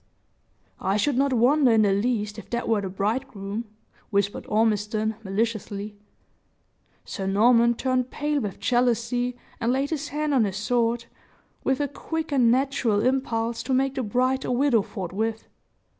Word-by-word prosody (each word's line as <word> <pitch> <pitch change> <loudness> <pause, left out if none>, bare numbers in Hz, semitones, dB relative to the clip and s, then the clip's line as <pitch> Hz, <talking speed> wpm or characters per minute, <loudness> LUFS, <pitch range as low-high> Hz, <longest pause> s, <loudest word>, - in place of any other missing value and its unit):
"I 195 +2 0
should 275 +6 +1
not 275 +2 +2
wonder 255 +2 +4
in 220 -1 +5
the 200 -2 +3
least 210 0 -1
if 215 - -13
that 235 0 -2
were 220 -3 +2
the 195 - -4
bridegroom," 205 +1 -3 0.4
whispered 200 -1 -1
Ormiston, 215 0 +1
maliciously. 205 0 -2 1.1
Sir 195 - -4
Norman 235 +4 +4
turned 255 0 0
pale 295 +1 -1
with 205 -4 -5
jealousy, 245 0 +1 0.2
and 230 - +1
laid 270 +3 0
his 305 -2 -2
hand 300 +2 -1
on 245 -5 +4
his 190 -2 -3
sword, 235 +2 0 0.6
with 265 +1 +1
a 290 - 0
quick 320 +3 -5
and 255 -4 +4
natural 250 -4 +2
impulse 235 -3 0
to 265 - 0
make 270 +1 +1
the 270 - -2
bride 255 +4 0
a - - -2
widow 250 -2 +3
forthwith. 215 +3 -4
235 Hz, 155 wpm, -25 LUFS, 210-260 Hz, 1.1 s, in